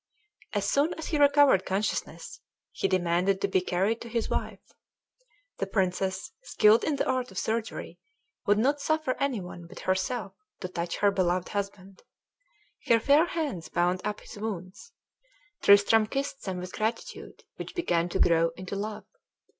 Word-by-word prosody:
As 205 -1 0
soon 290 +5 +2
as 320 - -6
he 305 - 0
recovered 285 -8 +5
consciousness 195 +3 -3 0.3
he - - -1
demanded 185 +1 +1
to 200 - +1
be 190 -1 +2
carried 195 +5 0
to 235 - -8
his 230 0 -2
wife. - - -4 0.9
The - - -1
princess, 190 -1 -1
skilled 220 - +4
in 300 - 0
the - - -1
art 255 -1 0
of - - -11
surgery, 225 0 -3 0.5
would 205 0 +4
not 280 +6 +2
suffer 310 -4 0
any 275 -5 0
one 180 -2 -9
but - - -11
herself 190 +2 -1 0.3
to 185 - -3
touch 170 -1 -3
her 205 -1 +3
beloved 180 -2 0
husband. 200 -2 -5 0.9
Her 230 - +5
fair 285 +7 +5
hands 290 - -3
bound 180 +2 +1
up 210 0 -3
his - - -11
wounds; 200 - -6 0.7
Tristram 205 +2 +6
kissed 275 +3 -4
them 190 -2 -3
with 180 +1 -7
gratitude, 220 +2 -4
which - - -7
began 175 - 0
to - - -2
grow 165 0 +4
into 185 +1 -6
love. 210 +2 -5
205 Hz, 160 wpm, -28 LUFS, 185-250 Hz, 0.9 s, Tristram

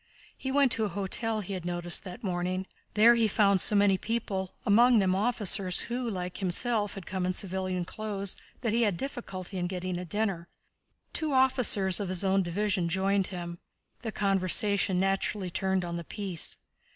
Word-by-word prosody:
He 265 - -4
went 275 -2 +3
to 230 - +1
a - - +1
hotel 210 +4 -2
he 195 0 -6
had 185 -3 -5
noticed 175 0 -1
that 185 +6 -9
morning. 185 0 -2 0.3
There 225 +3 +7
he 230 -2 +3
found 200 -2 +3
so 210 - +3
many 200 -2 +4
people, 200 -5 -3
among 235 +4 +5
them 190 -3 +3
officers 200 -3 +1
who, 245 0 -3
like 180 -3 -4
himself, 205 +3 +2
had 195 -3 -8
come 190 0 -3
in 185 0 0
civilian 185 -2 -1
clothes, 200 -1 -4 0.3
that 230 -3 -1
he 235 - +2
had 205 -6 +1
difficulty 195 -8 -5
in 175 - -1
getting 180 -1 -4
a - - -5
dinner. 190 -2 -2 0.7
Two 310 -3 0
officers 250 -8 +3
of 200 -3 -3
his 185 0 0
own 195 0 +3
division 190 0 0
joined 195 +2 +1
him. 175 -2 -6 0.4
The 225 - -4
conversation 195 -1 +2
naturally 195 0 0
turned 190 0 0
on 170 0 -4
the 170 - -5
peace. 190 -2 -4
195 Hz, 175 wpm, -29 LUFS, 185-215 Hz, 0.7 s, There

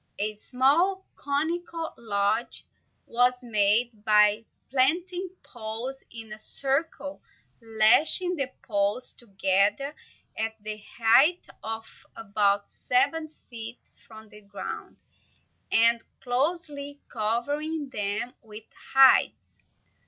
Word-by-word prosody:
A 215 +1 -1
small, 290 - +1
conical 325 +3 -3
lodge 215 +1 -1 0.4
was 250 +1 +1
made 215 0 +1
by 210 0 +4 0.3
planting 350 +8 +1
poles 235 +3 -7
in 225 -2 -9
a 215 - -9
circle, 285 +4 -1 0.4
lashing 230 - +4
the 275 -5 -2 0.2
tops 205 +2 -1
together 200 +5 0 0.4
at 220 0 -2
the 215 0 -7
height 260 +10 +4 0.2
of 225 0 -5 0.3
about 205 -2 0
seven 280 +6 0 0.2
feet 230 0 -8 0.3
from 220 -1 -13
the 210 - -15
ground, 200 0 -8 0.7
and 230 +1 +4 0.2
closely 285 +2 -2
covering 285 +7 -2
them 210 +3 -3
with 215 -1 -11 0.3
hides. 270 -1 +5
235 Hz, 95 wpm, -26 LUFS, 215-285 Hz, 0.7 s, hides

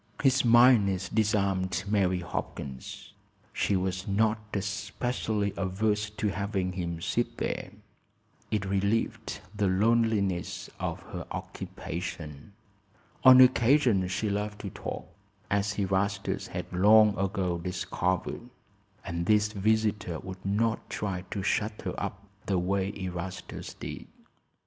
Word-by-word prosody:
His 135 -1 +4
mildness 115 -6 +5
disarmed 100 -4 +1
Mary 95 -3 +2
Hopkins. 65 -5 -6 0.4
She 100 - +1
was 95 0 -1
not 110 +2 +2
especially 100 +1 -2
averse 105 +2 0
to 105 0 -2
having 100 -2 -2
him 85 -2 -3
sit - - -1
there. - - -2 0.8
It 105 -2 -1
relieved 100 +1 -1
the 105 -1 +1
loneliness 100 -2 +1
of - - -3
her - - -5
occupation. 80 +1 -6 0.7
On 130 -1 +10
occasions 120 -6 +4
she 100 +2 -1
loved 105 0 -3
to 100 - -5
talk, - - -6 0.5
as 100 0 +1
Erastus 100 0 0
had - - -6
long 105 +3 +6
ago 95 -2 -1
discovered; 90 +5 -2 0.6
and 85 -1 -3
this 105 0 +4
visitor 105 -3 +1
would 95 0 -8
not 110 +3 0
try 95 -3 -3
to 100 - -3
shut 105 +2 0
her - - -2
up 100 +2 -5 0.2
the 95 - +2
way 95 +2 0
Erastus 90 -1 -6
did. - - -7
100 Hz, 115 wpm, -29 LUFS, 95-110 Hz, 0.8 s, On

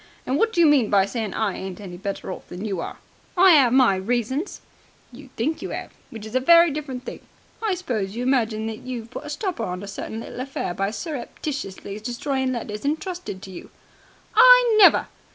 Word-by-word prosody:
And 260 - -1
what 455 - +2
do 350 - -2
you 340 - +7
mean 280 -8 +4
by 195 -1 +4
saying 220 -1 -4
I 215 -3 -1
ain't 190 -1 -7
any 190 -4 -8
better 195 +1 -5
off - - -9
than 180 +4 -6
you 195 -4 -2
are?" - - -6 0.4
"I 365 -1 +7
'ave 245 0 +2
my 255 -7 +5
reasons." 245 - -2 0.5
"You 265 +2 -13
think 300 +8 -1
you - - -5
'ave, - - -6 0.2
which 225 -2 -9
is 220 - -9
a 255 - +3
very 335 +4 +6
different 275 -4 -5
thing. - - -7 0.4
I 430 -4 0
suppose 220 - -3
you 240 - -3
imagine 225 -4 +1
that 220 -1 -5
you've 240 -2 -7
put - - -7
a - - -7
stopper 310 - -3
on 180 -1 -4
a - - -7
certain 220 +2 -6
little 240 - -8
affair 255 -8 -3
by 195 +2 -1
surreptitiously 235 - -5
destroying 260 +3 -2
letters 215 -4 -5
entrusted 320 - -4
to 190 - -9
you." 180 - -10 0.6
"I - - +7
never!" 395 - +7
245 Hz, 205 wpm, -23 LUFS, 210-295 Hz, 0.6 s, you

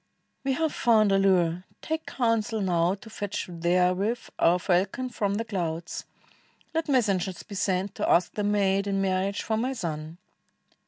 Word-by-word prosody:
we 270 -1 +1
have 320 +2 0
found 220 -4 +4
a 195 - +4
lure; 180 -3 +2 0.2
take 320 0 -3
counsel 230 -3 0
now 180 -2 +2
To 210 +3 -15
fetch 205 -2 -4
therewith 180 +6 0
our 175 +2 +5
falcon 190 +8 0
from 200 -4 -1
the 225 +2 -2
clouds. 170 -5 -3 0.7
Let 325 -1 -1
messengers 195 -8 +1
be - - -11
sent 190 0 0
to - - -2
ask 175 - +3
the 210 - -2
maid 200 -1 +2
In 195 -1 0
marriage 195 +1 0
for 220 -1 -1
my 255 +4 -1
son." 160 -7 -5
195 Hz, 160 wpm, -27 LUFS, 180-220 Hz, 0.7 s, our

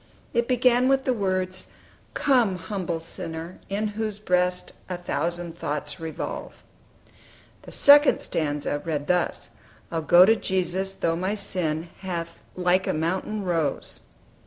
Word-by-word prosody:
It 235 -1 +1
began 250 0 +3
with 270 0 +3
the 255 - +2
words 185 -3 -2 0.5
"Come, 245 -9 +3
humble 180 -2 -3
sinner, 165 +1 -7
in 210 +2 -1
whose 215 -1 -3
breast 180 -3 0 0.2
A 180 - -3
thousand 175 0 -3
thoughts 150 0 -3
revolve." 160 -1 -6 1.0
The - - -12
second 290 +1 +7
stanza 145 -1 -2
read 150 -3 -2
thus: 180 +1 -1 0.4
"I'll 165 - -1
go 175 +3 +7
to 220 +3 +5
Jesus, 190 -1 -1
though 165 - 0
my 185 +4 -1
sin 165 -5 -2
Hath 170 -3 -5 0.2
like 180 +1 +2
a - - +1
mountain 185 +6 -2
rose." 165 -6 -2
180 Hz, 135 wpm, -25 LUFS, 165-210 Hz, 1.0 s, second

